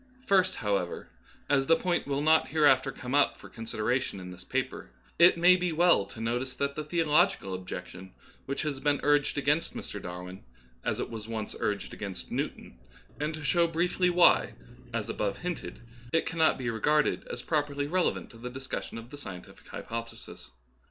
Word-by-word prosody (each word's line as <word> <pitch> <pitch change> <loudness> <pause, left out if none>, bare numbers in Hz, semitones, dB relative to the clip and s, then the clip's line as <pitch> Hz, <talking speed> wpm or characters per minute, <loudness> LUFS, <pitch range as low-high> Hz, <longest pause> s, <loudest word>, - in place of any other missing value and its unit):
First, 190 -2 +3
however, 100 -6 -2 0.4
as 135 -1 +2
the 165 - +6
point 175 -3 -1
will 140 0 -1
not 160 +1 +5
hereafter 140 -3 +4
come 125 0 -6
up 145 0 +3
for - - -13
con 115 -1 -9
sideration 120 -1 -1
in 90 0 -8
this 90 0 -11
paper, - - -3 0.3
it 170 0 +7
may 180 +2 +7
be 180 -1 0
well 170 - +4
to 100 - -11
notice 120 +3 -2
the 140 +2 0
theological 155 - +1
objection 90 0 -7 0.4
which 140 +3 -2
has 145 -3 -2
been 145 0 +1
urged 145 0 +3
*against 145 +3 +1
Mr. - - -6
Darwin, 90 +1 -7 0.4
as - - -1
it - - -3
was 110 -1 -7
once 110 -2 -4
urged 100 -2 -2
against 100 -3 -7
Newton, 60 - -4 0.4
and 150 +1 -1
to 155 - -8
show 170 +4 +3
briefly 175 +2 +1
why, 175 0 +5 0.4
as - - -2
above 100 -2 -2
hinted, 175 -1 -5 0.3
it 165 - +2
cannot 160 -1 +2
be 120 -3 -2
regarded 150 +7 +1
as - - -6
properly 145 -2 0
relevant 180 +4 0
to 115 - -14
the 125 +1 -5
discussion 130 -2 -6
of 115 +2 -10
the 145 - -8
scientific 95 -9 -10
hypothesis. 115 - -7
140 Hz, 175 wpm, -29 LUFS, 110-160 Hz, 0.4 s, it